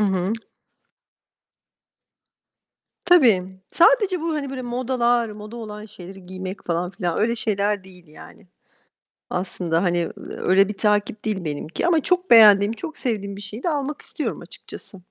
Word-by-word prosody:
Hı 210 - +3
hı. 190 +1 0 2.7
Tabii. 255 - +5 0.3
Sadece 375 -1 +4
bu, 325 -1 -2
hani, 280 -3 -3
böyle 260 -1 -5
modalar, 240 -1 0
moda 210 +2 -9
olan 210 -2 -8
şeyleri 190 -2 -12
giymek 185 +1 -7
falan 175 +1 -1
filan, 175 -3 -3
öyle 235 +2 +1
şeyler 205 -3 -1
değil 180 -3 -12
yani. 155 +4 -15 0.8
Aslında, 180 -2 -2
hani, 175 -2 +1
eee, 170 - -1
öyle 195 +2 +1
bir 210 - -6
takip 210 0 0
değil 200 -5 -2
benimki 155 - -3
ama 335 -2 +4
çok 360 +3 0
beğendiğim, 210 -2 +7
çok 315 +5 -7
sevdiğim 200 -6 -3
bir 200 - -9
şeyi 210 +4 -8
de - - +1
almak 295 -1 -3
istiyorum - - -5
açıkçası. 195 - -12
210 Hz, 145 wpm, -22 LUFS, 185-245 Hz, 2.7 s, beğendiğim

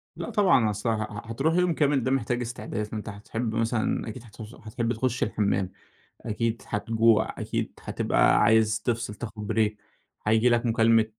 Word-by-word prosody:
لأ - - -5
طبعًا، 175 - +4
أصل 105 +3 -2
ه - - +3
ه 105 -1 -7
هتروح 145 +8 +1
يوم 180 -1 +3
كامل 145 -4 +2
ده 130 - 0
محتاج 125 -2 0
استعداد، 115 -2 -4
فأنت 105 +1 -6
هتحب 110 +3 -4
مثلًا 115 0 0
أكيد 115 +2 -8
هتوص 110 +1 -11
هتحب 115 +2 -3
تخُش 125 +1 -1
الحمام، 100 -3 0 0.5
أكيد 115 +1 -2
هتجوع، 115 +1 +2
أكيد - - -3
هتبقى - - +2
عايز 110 0 +4
تِفصل، 115 -3 -2
تاخُد 105 -1 -7
بريك 105 -1 +1 0.5
هييجي 110 +3 +4
لك 120 0 +2
مكالمة 115 -1 +4
115 Hz, 160 wpm, -26 LUFS, 110-120 Hz, 0.5 s, طبعًا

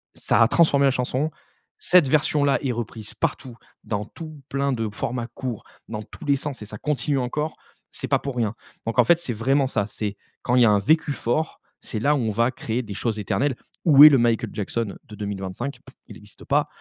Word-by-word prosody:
ça - - +1
a 115 - +7
transformé 140 -1 +4
la 135 - +4
chanson. 130 +4 -1 0.5
Cette 180 -5 +4
version-là 145 0 +2
est 135 - 0
reprise 115 -2 -6
partout, 135 -6 -3 0.3
dans 105 -1 -3
tout 155 +1 -10
plein 140 0 0
de 115 -3 -2
formats 120 +3 -3
courts, 125 -5 -5 0.2
dans 110 -1 -5
tous - - -12
les 140 -1 +3
sens, 140 -2 -5
et - - -6
ça 105 +1 -8
continue 145 +1 -1
encore. 150 +5 -2 0.4
C'est - - -4
pas - - +2
pour 140 -2 -5
rien, 115 -3 -1 0.3
donc 115 +2 -1
en - - +8
fait, 170 +9 +4
c'est 170 -7 -5
vraiment 135 +6 +2
ça. 105 -5 -1
C'est 105 -1 -4 0.2
quand 125 - 0
il 125 - +6
y - - +7
a - - +5
un 105 -1 +4
vécu 155 +8 +2
fort, 140 +5 -2 0.2
c'est 110 - -5
là 145 +7 +3
où - - 0
on 110 -3 0
va 115 +4 +1
créer 120 -1 -3
des 105 -4 -7
choses 110 +2 -2
éternelles. 130 +6 0 0.3
Où 145 -4 +9
est 155 - +13
le 140 - +5
Michael 120 -2 +1
Jackson 105 +1 -3
de 105 - -11
2025? 100 +5 -5
Pfff. - - -15
Il - - -11
n'existe - - -14
pas, - - +1
125 Hz, 220 wpm, -24 LUFS, 110-140 Hz, 0.5 s, est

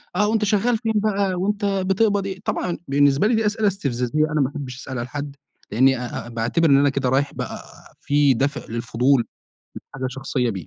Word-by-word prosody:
آه 210 - +3
وأنت 220 0 +1
شغّال 225 +3 +2
فين 225 0 -2
بقى 200 -2 +1
وأنت 205 +3 -1
بتقبض 195 +1 +1
إيه، 190 -1 -5
طبعًا 175 -2 -2
بالنسبة 145 +5 +3
لي 230 - +2
دي 220 -1 +1
أسئلة 210 0 +1
استفزازية 145 -6 0
أنا 150 - +1
ما 135 - +1
أحبّش 140 -4 -7
أسألها 130 -3 -5
لحد 145 +2 -6 0.4
لأني 130 +5 +4
أ 125 -1 -5
أ - - -9
باعتِبر 120 +8 +1
إن 140 - +6
أنا 140 +1 +4
كده 135 -2 -1
رايح 140 +2 +1
بقى - - -6 0.4
في 145 -1 +3
دافع 140 +5 -1
للفضول 120 +2 +1 0.5
لحاجة 130 -1 -6
شخصية 130 -2 -2
بيه. 95 -7 -6
145 Hz, 190 wpm, -22 LUFS, 130-200 Hz, 0.5 s, إن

